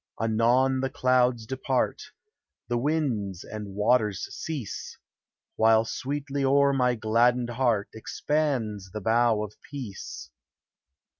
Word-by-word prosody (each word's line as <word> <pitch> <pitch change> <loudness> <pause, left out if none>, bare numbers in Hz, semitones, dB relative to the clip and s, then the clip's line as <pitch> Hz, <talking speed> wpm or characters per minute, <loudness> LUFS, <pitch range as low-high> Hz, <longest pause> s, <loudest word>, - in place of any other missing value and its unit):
Anon 120 +4 +2
the 135 0 -1
clouds 125 -3 +2
depart. 130 +1 -1 0.7
The 120 - +1
winds 120 - -1
and 105 -2 -7
waters 105 -2 +2
cease; 145 -10 -5 0.6
While 110 0 +5
sweetly 140 +3 -3
o'er 140 +1 +4
my 125 -2 +2
gladdened 120 +2 +2
heart 120 -4 +1
Expands 110 -5 -2
the 105 - -4
bow 115 0 +2
of 105 -1 -7 0.2
peace 130 -9 -7
120 Hz, 105 wpm, -27 LUFS, 110-135 Hz, 0.7 s, While